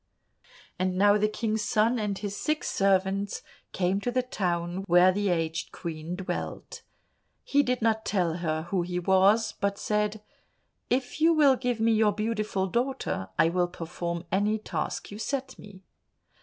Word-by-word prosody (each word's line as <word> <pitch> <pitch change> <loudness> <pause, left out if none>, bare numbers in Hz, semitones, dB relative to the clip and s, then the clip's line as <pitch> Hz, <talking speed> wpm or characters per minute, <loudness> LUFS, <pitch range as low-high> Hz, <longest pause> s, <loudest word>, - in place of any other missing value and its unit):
And 185 0 0
now 205 +1 +5
the 210 - +3
King's 220 0 -2
son 220 +3 +2
and 205 -2 -2
his 200 0 -4
six 305 +7 -1
servants 195 +1 +1 0.3
came 190 +2 0
to 245 - -1
the 255 +1 0
town 175 -5 -2
where 180 +2 +6
the 205 +1 0
aged 165 -2 -1
Queen 165 +1 -5
dwelt. 185 0 -5 0.6
He 285 - +3
did 250 -4 -1
not 220 -1 +2
tell 175 -6 0
her 160 -2 -2
who 190 -3 +1
he 175 +1 -3
was, 190 +5 +3
but 200 0 0
said, 210 0 -1 0.7
"If 255 +4 -1
you 330 +1 +6
will 285 -4 +5
give 250 -2 -2
me 225 +1 +3
your 215 -1 +3
beautiful 215 -2 -1
daughter, 240 - -2
I 165 - +4
will 175 +1 +1
perform 170 0 -5
any 205 +3 +2
task 215 - -4
you 205 - -8
set 265 +1 -4
me." 195 -2 -13
200 Hz, 160 wpm, -27 LUFS, 180-220 Hz, 0.7 s, where